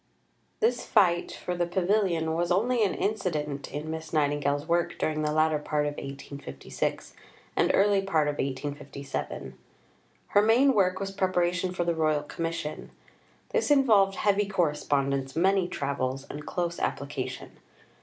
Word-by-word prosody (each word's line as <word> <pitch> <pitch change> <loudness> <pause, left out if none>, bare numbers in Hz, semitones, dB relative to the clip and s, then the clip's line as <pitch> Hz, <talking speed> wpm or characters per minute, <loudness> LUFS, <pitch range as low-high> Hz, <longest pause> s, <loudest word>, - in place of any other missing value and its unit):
IV - - -42
This 455 +2 +2
fight 175 -5 +3
for 180 - -4
the 175 -1 0
pavilion 175 -3 +1
was 170 +2 0
only 230 +5 +2
an 195 - +1
incident 155 -9 -2
in 150 +3 -4
Miss 160 0 -6
Nightingale's 145 -1 +1
work 170 0 +1
during 155 0 -1
the 150 0 0
latter 155 0 +2
part 150 0 -1
of 145 - -1
1856 140 - -5 0.4
and - - +3
earlier 200 0 +4
part 160 -6 +1
of 145 0 -2
1857. 140 - -4 0.8
Her 205 - +5
main 245 +6 +5
work 185 -4 +2
was 195 0 -3
preparation 180 -1 0
for 180 -1 -1
the 170 0 +1
Royal 155 -2 +1
Commission. 165 0 -4 0.6
This 470 -7 0
involved 220 -9 +5
heavy 205 0 +2
correspondence, 140 -7 0
many 190 +2 +3
travels, 135 -3 -2
and 150 +1 -8
close 170 -1 -2
application. - - -4
170 Hz, 145 wpm, -28 LUFS, 145-195 Hz, 0.8 s, Her